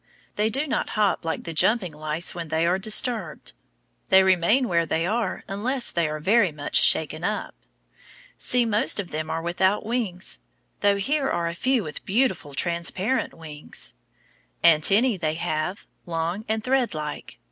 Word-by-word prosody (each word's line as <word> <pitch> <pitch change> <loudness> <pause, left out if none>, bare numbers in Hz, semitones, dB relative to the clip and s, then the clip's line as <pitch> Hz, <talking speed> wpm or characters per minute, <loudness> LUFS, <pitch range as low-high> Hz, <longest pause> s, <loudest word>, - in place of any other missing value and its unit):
They 210 +1 +1
do 275 +6 -1
not 285 - -1
hop 210 -3 +2
like 165 -1 -3
the 165 - -6
jumping 190 +2 +2
plant 150 0 -14
lice 155 +2 -1
when 170 -2 -5
they 160 +1 0
are 180 +2 +2
disturbed. 215 - 0 0.6
They 190 0 +7
remain 190 +8 +3
where 170 -3 +1
they 165 +2 0
are 220 +4 -1
unless 235 +6 -1
they 170 -2 0
are 155 0 -4
very 195 +3 +3
much 145 -1 +1
shaken 155 +1 +3
up. 210 +3 -2 0.8
See, 245 -1 +1
most 220 0 +2
of 190 -4 -5
them 155 +1 -4
are 165 - -3
without 190 +5 +1
wings, 215 - -2 0.4
though 200 -1 +3
here 270 +7 0
are 170 -1 -1
a 170 - -3
few 255 +5 +1
with 155 -3 -8
beautiful 190 - 0
transparent 180 - 0
wings. 155 -2 -8 0.7
Antennæ 195 +8 +4
they 155 -1 -1
have, 160 +3 -3 0.2
long 170 +5 -2
and 220 0 -1
threadlike. 220 - -2
185 Hz, 160 wpm, -24 LUFS, 165-220 Hz, 0.8 s, They